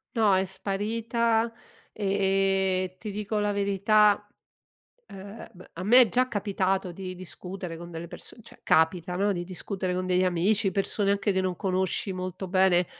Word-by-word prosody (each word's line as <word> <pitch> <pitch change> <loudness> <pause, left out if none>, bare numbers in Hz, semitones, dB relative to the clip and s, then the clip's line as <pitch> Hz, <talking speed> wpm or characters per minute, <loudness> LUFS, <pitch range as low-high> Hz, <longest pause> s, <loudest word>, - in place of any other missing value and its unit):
No, 215 -4 +4
è 190 0 +2
sparita, 225 +4 -1 0.4
ehm, 195 -2 +1
ti 210 +3 -6
dico 210 +1 -3
la 205 0 0
verità, 205 +1 +3 0.8
ehm, 200 +3 -10
m - - -11
a 170 - -6
me 240 +6 +7
è 245 - +6
già 255 +3 +1
capitato 195 -3 -1
di 185 +1 -7
discutere 180 -1 -7
con 170 +1 -9
delle 170 0 -7
perso - - -10
cioè - - -17
capita, 165 +2 +2
no, 200 +2 +2
di 175 -2 -4
discutere 185 +1 -4
con 185 0 -2
degli 185 0 +2
amici, 195 +4 +2
persone 200 0 0
anche 200 +1 +1
che 190 - +1
non 185 -1 -2
conosci 190 0 -1
molto 185 +1 -5
bene. 185 -2 +3
195 Hz, 160 wpm, -27 LUFS, 185-205 Hz, 0.8 s, me